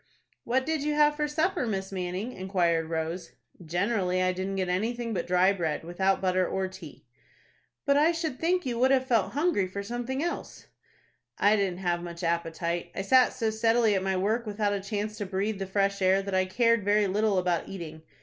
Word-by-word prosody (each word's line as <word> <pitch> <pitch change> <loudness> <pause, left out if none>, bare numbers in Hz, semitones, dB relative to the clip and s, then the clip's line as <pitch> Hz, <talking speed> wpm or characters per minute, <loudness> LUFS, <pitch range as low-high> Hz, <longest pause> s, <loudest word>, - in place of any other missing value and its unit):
"What 260 +2 +1
did 315 -2 -1
you 300 +1 -1
have 295 0 +4
for 300 0 -1
supper, 315 -1 0
Miss 195 -2 -3
Manning?" 185 +5 -4
inquired 175 -4 0
Rose. 165 +2 -3 0.3
"Generally 185 +2 0
I 185 0 +2
didn't 190 +1 -3
get 190 -1 -1
anything 230 +6 -1
but 175 - -2
dry 180 +2 +4
bread, 160 -6 -2
without 190 +3 0
butter 185 -1 +2
or 190 0 -1
tea." 185 -5 -12 0.8
"But 280 0 +3
I 310 +3 +5
should 325 -5 -3
think 360 +2 +1
you 240 -2 -2
would 260 +1 +4
have 265 -1 +3
felt 230 -6 +1
hungry 290 - +1
for 200 +2 -5
something 245 +6 -3
else." 345 - -5 0.7
"I 205 +1 +4
didn't 190 -3 -1
have 175 -2 0
much 170 0 -7
appetite. 170 0 -2
I 195 - -2
sat 255 +5 +5
so 225 -3 -1
steadily 225 0 +3
at 190 - +1
my 190 0 0
work, 220 +5 0
without 205 -1 0
a 200 - -2
chance 210 +2 -4
to 205 - -2
breathe 200 +2 -2
the 195 - -3
fresh 200 0 0
air, 190 +1 +3
that 200 0 -5
I 185 0 +3
cared 230 +3 +2
very 205 +1 +3
little 205 +1 +1
about 180 -2 0
eating. 160 -4 -7
195 Hz, 200 wpm, -28 LUFS, 185-235 Hz, 0.8 s, I